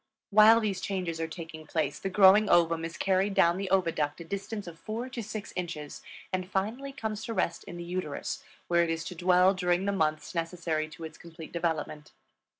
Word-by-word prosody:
While 215 +2 +8
these 200 -4 -1
changes 180 -5 -2
are 165 - -1
taking 160 -2 -9
place 150 -4 -1
the 195 - -3
growing 195 +2 +6
ovum 165 -1 +4
is 165 +1 -5
carried 195 +1 +1
down 170 +1 +4
the 195 0 -3
oviduct 165 -6 +1
a - - -6
distance 200 +4 -5
of 165 -2 -10
four 230 +4 -4
to 255 -2 -5
six 215 -2 -6
inches 165 -5 -5 0.3
and 185 0 -2
finally 225 +9 -2
comes 220 -6 -4
to 230 - -4
rest 170 - -1
in 175 - -8
the 175 - -6
uterus, 175 -4 -4 0.2
where 170 0 +3
it 170 - +1
is 165 0 -1
to 180 - -7
dwell 180 +2 +4
during 180 0 +1
the 200 - +1
months 155 -4 -1
necessary 165 -2 -2
to 160 +1 -11
its 160 - -8
complete 165 -1 -11
development. 160 -3 -3
180 Hz, 200 wpm, -29 LUFS, 165-195 Hz, 0.3 s, While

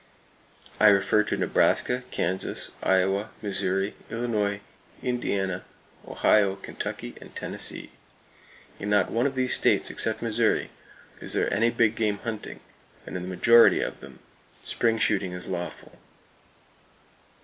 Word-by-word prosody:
I 110 - +7
refer 100 +1 +4
to - - -2
Nebraska, 125 +1 +1
Kansas, 95 +2 -2
Iowa, 95 +3 +1
Missouri, 95 -1 -1 0.2
Illinois, 105 -4 -1 0.4
Indiana, 95 -7 -1 0.4
Ohio, 100 -2 +3
Kentucky 95 -9 -6
and - - -14
Tennessee. - - -2 0.9
In 100 - -4
not 105 0 +2
one 120 +4 +2
of 135 - -5
these 130 -1 +1
states - - +3
except 110 +1 -1
Missouri 115 0 +1 0.5
is - - -3
there - - 0
any 115 +3 +3
big 115 -2 +2
game 105 -3 0
hunting, 110 0 -6 0.4
and - - -8
in 90 - -3
the 90 - -6
majority 115 +5 +5
of - - -4
them - - -12 0.5
spring 115 -1 0
shooting 100 -4 0
is 90 0 -7
lawful! 90 -2 -6
105 Hz, 125 wpm, -26 LUFS, 95-115 Hz, 0.9 s, I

